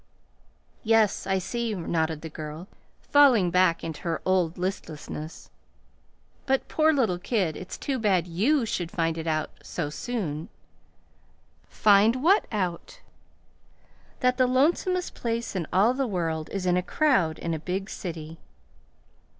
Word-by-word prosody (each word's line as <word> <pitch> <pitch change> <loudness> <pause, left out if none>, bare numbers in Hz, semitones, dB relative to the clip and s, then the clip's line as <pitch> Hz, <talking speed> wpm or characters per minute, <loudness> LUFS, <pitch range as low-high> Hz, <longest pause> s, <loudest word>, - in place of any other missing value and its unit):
"Yes, 220 -4 +2
I 190 0 +2
see," 230 +3 -2
nodded 160 -3 -1
the - - -4
girl, 155 +3 -8 0.4
falling 250 -11 +5
back 180 -1 +3
into 160 -2 -5
her 165 -2 -2
old 180 -3 +1
listlessness. 160 -3 -6 1.0
"But, 270 -1 +1
poor 315 0 +3
little 225 - +1
kid, 185 -6 0
it's 185 - -7
too 270 -3 -2
bad 190 -6 +2
YOU 230 - +1
should 180 -7 -3
find 165 -2 -1
it 165 0 -5
out 155 -1 -1
so 150 -4 -4
soon." 165 -6 -4 1.2
"Find 215 +5 +4
what 390 +6 +4
out?" 200 - -3 1.2
"That 250 -1 +2
the 255 - +4
lonesomest 345 +8 +1
place 230 -2 -3
in 170 -4 -2
all 205 +7 +4
the 265 0 -1
world 165 -6 -2
is 195 -2 -4
in 180 0 +3
a - - +2
crowd 185 - +1
in 170 - -3
a 160 - -3
big 190 +4 -3
city." 165 -5 -7
185 Hz, 140 wpm, -26 LUFS, 165-235 Hz, 1.2 s, falling